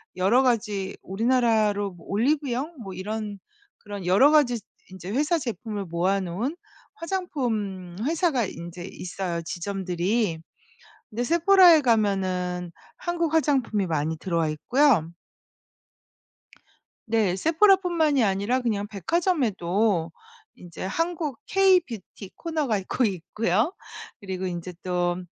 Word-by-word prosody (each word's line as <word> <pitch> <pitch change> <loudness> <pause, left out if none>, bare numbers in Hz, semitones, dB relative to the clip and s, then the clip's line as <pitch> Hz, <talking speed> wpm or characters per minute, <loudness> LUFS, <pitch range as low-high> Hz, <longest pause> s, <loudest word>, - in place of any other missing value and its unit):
여러 205 +8 +3
가지 210 -6 0
우리나라로 215 -2 +1
뭐 175 -2 -16
올리브영 275 - 0
뭐 195 -3 -7
이런 210 +2 -5 0.4
그런 205 -3 -8
여러 205 +12 +5
가지 250 -7 +4 0.3
인제 185 +1 -8
회사 300 +7 +1
제품을 225 -6 -4
모아 180 +4 0
놓은 205 - -3 0.4
화장품 230 - -3
회사가 310 - +1
인제 175 0 -8
있어요, 175 -2 -4
지점들이. 180 +1 -2 0.7
근데 230 +3 -3
세포라에 340 +1 +6
가면은 185 -6 0 0.2
한국 340 -2 -2
화장품이 260 -10 +1
많이 160 0 -1
들어와 165 -4 0
있고요. 175 - +2 1.9
네. 215 -5 +1
세포라 355 - +5
뿐만이 320 - +1
아니라 205 +6 +1
그냥 205 -4 -1
백화점에도 210 - 0 0.4
이제 175 0 -10
한국 325 - -2
K-뷰티 350 - +1
코너가 305 -10 -1
있고 235 +6 0
있고요. 210 - 0 0.5
그리고 190 -2 -5
이제 175 0 -5
또 175 -1 0
210 Hz, 260 characters per minute, -25 LUFS, 185-280 Hz, 1.9 s, 세포라에